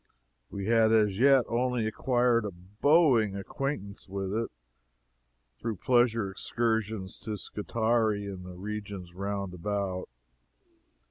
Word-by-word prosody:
We 100 -1 -5
had 115 0 +4
as 105 -3 +3
yet 135 0 +6
only 125 -1 0
acquired 120 +1 +2
a 105 - -2
bowing 110 - +3
acquaintance 100 0 -4
with 95 0 -3
it, 115 +1 -1 1.1
through 115 -1 -2
pleasure 115 -2 +2
excursions 110 -2 -2
to 105 -1 -4
Scutari 110 0 0
and 95 -2 -6
the 90 0 -9
regions 100 -2 -6
round 100 0 -3
about. 95 0 -3
105 Hz, 115 wpm, -29 LUFS, 100-115 Hz, 1.1 s, yet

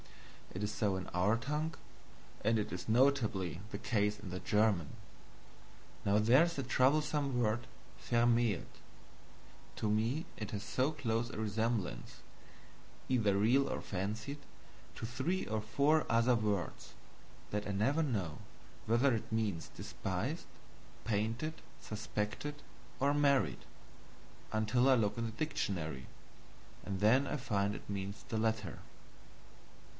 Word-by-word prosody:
It 95 - -3
is 105 - -1
so 100 -3 0
in 95 -1 -4
our 95 +6 +2
tongue, 150 +7 -2 0.7
and 110 +2 +3
it 105 -5 -2
is 90 +2 -5
notably 110 - +2
the 100 - -4
case 105 -2 0
in 100 -3 -8
the 90 - -3
German. 105 -7 +2 1.1
Now 100 +1 +3
there 120 +8 +6
is 170 0 -1
that 135 -3 -3
troublesome 140 0 +2
word 120 0 +1 0.4
VERMÄHLT: 120 -4 +3 1.1
to 110 - 0
me 115 +9 +1
it 105 - -5
has 100 -1 -3
so 130 +4 +1
close 120 -6 -1
a - - -7
resemblance 110 - -1 0.9
either 110 -6 +3
real 125 +7 +4
or - - -2
fancied 110 +9 -3 0.6
to - - -5
three 135 +11 -1
or 110 0 -1
four 140 +8 +3
other 115 +2 +4
words, 105 -6 -2 0.6
that 105 0 -1
I - - -1
never 130 +11 +2
know 100 - -2 0.5
whether 120 +4 +4
it 110 - -5
means 105 -7 -1
despised, - - -4 0.6
painted, 115 +8 0 0.3
suspected, 110 +6 -3 0.4
or 140 +1 +3
married; 140 -2 +2 0.9
until 110 +4 +3
I 130 - +7
look 110 -2 +1
in 115 - -1
the 115 - -3
dictionary, 90 - -2 0.8
and 95 -2 -3
then 125 +7 +5
I - - -1
find 100 -5 0
it - - -9
means 100 +2 -4
the 110 - -1
latter. 110 0 -1
110 Hz, 130 wpm, -34 LUFS, 105-130 Hz, 1.1 s, I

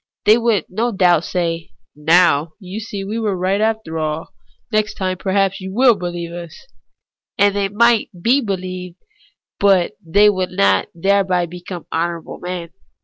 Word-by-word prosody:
They 215 - +7
would 230 -7 +1
no 225 +6 -1
doubt 175 -5 +3
say, 170 -2 -3
' - - -50
Now 160 0 +3
you 190 +2 -7
see 205 -3 -6
that - - -7
we 220 +3 -3
were 210 -4 -1
right 190 +3 0
after 220 -7 -1
all; 155 +1 -3 0.4
next 215 -1 0
time 185 -2 -2
perhaps 195 +1 0
you 190 - -6
Avill 240 +4 +4
beheve 175 -1 -5
us.' 170 -2 -9 0.7
And 200 0 +3
they 200 -1 0
might 235 +2 +3
be 245 +10 +3
believed, 185 -4 -5 0.6
but 195 -3 +3
they 200 +5 +4
would 185 -3 +1
not 100 -1 +2
thereby 190 0 +2
become 175 0 -8
honourable 170 0 -3
men. 175 -1 -5
185 Hz, 160 wpm, -19 LUFS, 170-205 Hz, 0.7 s, They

